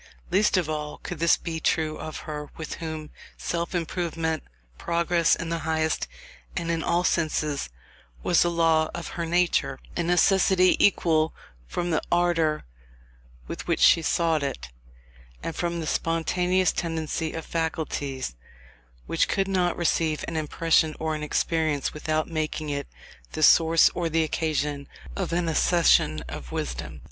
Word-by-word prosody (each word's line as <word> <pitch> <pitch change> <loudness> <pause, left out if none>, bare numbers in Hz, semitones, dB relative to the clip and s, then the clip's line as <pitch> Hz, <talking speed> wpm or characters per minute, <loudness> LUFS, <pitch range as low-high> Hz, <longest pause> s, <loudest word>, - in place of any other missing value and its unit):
Least 200 +2 +3
of 175 -4 +1
all 150 -1 -4
could 175 - -7
this 170 0 +4
be 165 -2 -4
true 155 -1 0
of 155 - -6
her, 150 -1 -6
with 160 -2 -5
whom 160 -2 -5 0.3
self 170 +1 -3
improvement, 165 -2 -2 0.4
progress 170 0 +2
in 165 - -5
the 165 0 -1
highest 160 - 0 0.5
and 170 0 -1
in 165 -1 -1
all 170 +2 +1
senses, 155 - 0 0.5
was 175 - +4
a 175 - +1
law 165 -2 +2
of 170 - -5
her 170 -1 -4
nature; 170 -6 +1 0.2
a - - 0
necessity 185 +1 +4
equally 160 -5 +3 0.4
from 175 - -2
the 160 - +1
ardour 170 - +2 0.8
with - - -6
which - - +1
she 165 - +6
sought 165 -1 +1
it, 135 - -4 0.7
and 165 - -4
from 170 -1 -2
the 160 - -3
spontaneous 180 +3 +1
tendency 160 -1 -2
of 160 - -5
faculties 150 - -3 0.7
which - - +1
could 195 0 0
not 180 -2 +1
receive 160 -2 0
an 165 - -4
impression 160 0 +2
or 160 0 -1
an 155 - -4
experience 155 -1 0
without 155 +1 -1
making 155 -1 -3
it 140 0 -3 0.5
the 155 - -1
source 165 +1 +6
or 170 -2 -1
the 165 0 +2
occasion 150 -2 -1 0.3
of - - -3
an 170 0 0
accession 160 - +3
of - - -8
wisdom. - - -4
160 Hz, 150 wpm, -26 LUFS, 155-170 Hz, 0.8 s, she